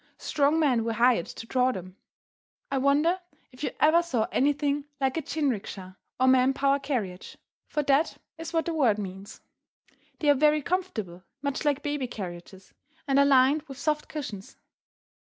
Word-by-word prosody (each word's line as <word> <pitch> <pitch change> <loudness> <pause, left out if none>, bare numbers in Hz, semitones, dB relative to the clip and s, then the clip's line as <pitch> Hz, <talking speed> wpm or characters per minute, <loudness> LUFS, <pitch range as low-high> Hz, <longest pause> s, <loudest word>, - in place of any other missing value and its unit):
Strong 295 +2 +1
men 260 -7 +2
were 230 0 -1
hired 235 -5 +3
to - - -9
draw 255 +2 +2
them. 185 -4 -8 0.8
I 270 - +1
wonder 295 +7 +2 0.3
if 255 +3 -11
you - - 0
ever 320 +3 +5
saw 255 -10 -1
anything 285 +1 +1
like 265 -1 0
a 325 - -1
jin 295 -1 0
riki 210 -5 -5
sha, 185 -1 -8 0.3
or 260 - +4
man 260 0 +4
power 275 +1 +2
carriage, 230 -10 -4 0.3
for 300 - -1
that 280 +3 +2 0.2
is 325 0 -6
what 325 -1 0
the 335 - -2
word 250 -10 +3
means. 195 -1 -8 0.8
They 300 - -2
are - - +6
very 300 +1 +3
comfortable, 245 - -3 0.2
much 280 +2 -2
like 290 -1 +1
baby 290 -3 -2
carriages, 185 -3 -9 0.3
and 275 0 +3
are 280 - +6
lined 275 +2 +4
with 270 -2 -9
soft 300 +1 -1
cushions. 220 -10 -7
275 Hz, 170 wpm, -27 LUFS, 230-295 Hz, 0.8 s, are